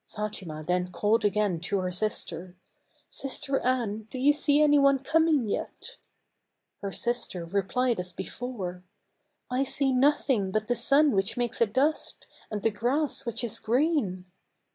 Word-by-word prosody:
Fatima 190 Hz, -7 st, -5 dB
then 180 Hz, +2 st, -1 dB
called 210 Hz, +4 st, +1 dB
again 205 Hz, -4 st, +1 dB
to 195 Hz, +4 st, -1 dB
her 185 Hz, -1 st, -2 dB
sister 180 Hz, -3 st, -3 dB, 0.3 s
" -, -, -47 dB, 0.2 s
Sister 275 Hz, 0 st, -1 dB
Anne, 225 Hz, -4 st, -1 dB
do -, -, -7 dB
you 280 Hz, +3 st, +4 dB
see 290 Hz, 0 st, +3 dB
any 295 Hz, -1 st, +5 dB
one 275 Hz, 0 st, +5 dB
coming 310 Hz, -2 st, +2 dB
yet?" 485 Hz, -, -5 dB, 0.8 s
Her 200 Hz, -, -4 dB
sister 230 Hz, -7 st, -2 dB
replied 200 Hz, +6 st, 0 dB
as 180 Hz, 0 st, -4 dB
before, 190 Hz, -2 st, -6 dB, 0.3 s
" -, -, -48 dB, 0.3 s
I 250 Hz, +1 st, +1 dB
see 275 Hz, 0 st, 0 dB
nothing 260 Hz, -6 st, +2 dB
but 215 Hz, +2 st, -1 dB
the 245 Hz, -, +1 dB
sun 285 Hz, +4 st, +4 dB
which 195 Hz, +1 st, 0 dB
makes 240 Hz, -1 st, -2 dB
a 230 Hz, -, +5 dB
dust, 270 Hz, +9 st, 0 dB, 0.2 s
and 210 Hz, -2 st, -4 dB
the 225 Hz, -, +3 dB
grass 270 Hz, +5 st, -1 dB
which 230 Hz, +1 st, -2 dB
is 235 Hz, -, -2 dB
green." 235 Hz, -, 0 dB
230 Hz, 160 wpm, -27 LUFS, 195-275 Hz, 0.8 s, any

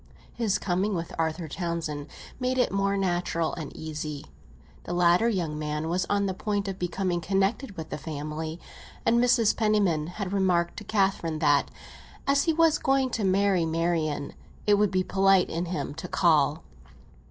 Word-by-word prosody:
His 220 Hz, -5 st, 0 dB
coming 190 Hz, +2 st, 0 dB
with 165 Hz, -1 st, -4 dB
Arthur 160 Hz, +1 st, -1 dB
Townsend 160 Hz, -3 st, -4 dB, 0.3 s
made 255 Hz, 0 st, 0 dB
it 250 Hz, -, +2 dB
more 200 Hz, 0 st, +1 dB
natural 175 Hz, -3 st, 0 dB
and 155 Hz, -4 st, -6 dB
easy; 150 Hz, -2 st, -5 dB, 0.6 s
the 175 Hz, -, -4 dB
latter 175 Hz, +5 st, +4 dB
young 165 Hz, -8 st, -2 dB
man 150 Hz, +1 st, -2 dB
was 180 Hz, +1 st, 0 dB
on 200 Hz, 0 st, +2 dB
the 190 Hz, -, -1 dB
point 205 Hz, +1 st, -2 dB
of 195 Hz, -1 st, -4 dB
becoming 180 Hz, 0 st, -1 dB
connected 195 Hz, -, 0 dB
with 160 Hz, -, -7 dB
the -, -, -4 dB
family, 155 Hz, +2 st, -5 dB, 0.5 s
and 235 Hz, +1 st, +4 dB
Mrs. 240 Hz, -3 st, +4 dB
Penniman 200 Hz, -8 st, +2 dB
had 190 Hz, +2 st, -5 dB
remarked 180 Hz, -3 st, +1 dB
to -, -, -6 dB
Catherine 195 Hz, -6 st, 0 dB
that, 145 Hz, -2 st, +3 dB, 0.6 s
as 280 Hz, 0 st, +3 dB
he 325 Hz, -, +2 dB
was 325 Hz, -1 st, +3 dB
going 270 Hz, -1 st, +1 dB
to 225 Hz, -, -2 dB
marry 195 Hz, -1 st, +3 dB
Marian, 160 Hz, -3 st, -1 dB, 0.3 s
it 205 Hz, -1 st, +4 dB
would 210 Hz, -1 st, +3 dB
be 185 Hz, 0 st, +1 dB
polite 195 Hz, -1 st, +3 dB
in 170 Hz, +2 st, -2 dB
him 175 Hz, -4 st, -3 dB
to 160 Hz, -, -7 dB
call. 155 Hz, -4 st, +2 dB
180 Hz, 165 wpm, -27 LUFS, 160-200 Hz, 0.6 s, latter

